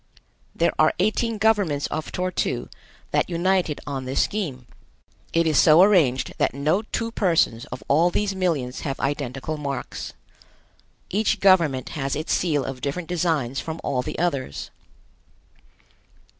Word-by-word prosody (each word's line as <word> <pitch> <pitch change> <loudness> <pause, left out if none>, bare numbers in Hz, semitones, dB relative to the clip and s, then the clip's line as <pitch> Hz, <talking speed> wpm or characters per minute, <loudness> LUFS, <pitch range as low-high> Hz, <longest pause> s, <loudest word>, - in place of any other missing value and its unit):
There - - +2
are - - +4
eighteen 225 +1 0
governments 200 -9 +2
of 155 - -4
Tor 185 0 -2
tu - - -2 0.4
that - - +1
united 175 -2 +1
on 135 -2 -4
this 130 +1 +1
scheme. 155 -12 -3 0.7
It 165 0 +2
is 155 -3 +3
so 160 +3 +7
arranged 160 -11 +3
that - - +1
no 155 +8 +1
two 230 +1 -3
persons 165 - +1
of - - -8
all 160 +5 +4
these 200 +2 -1
millions 155 -9 -1
have 135 -2 -4
identical 140 +2 -3
marks. 140 -3 -5 1.0
Each 210 +3 +1
government 165 -10 +3
has 135 -2 -3
its 155 +2 -2
seal 150 -6 +1
of 130 -1 -6
different 155 +5 -3
designs 155 -7 0
from 160 0 -5
all 130 -2 0
the 155 +4 -6
others. 140 - -2
155 Hz, 145 wpm, -24 LUFS, 135-185 Hz, 1.0 s, so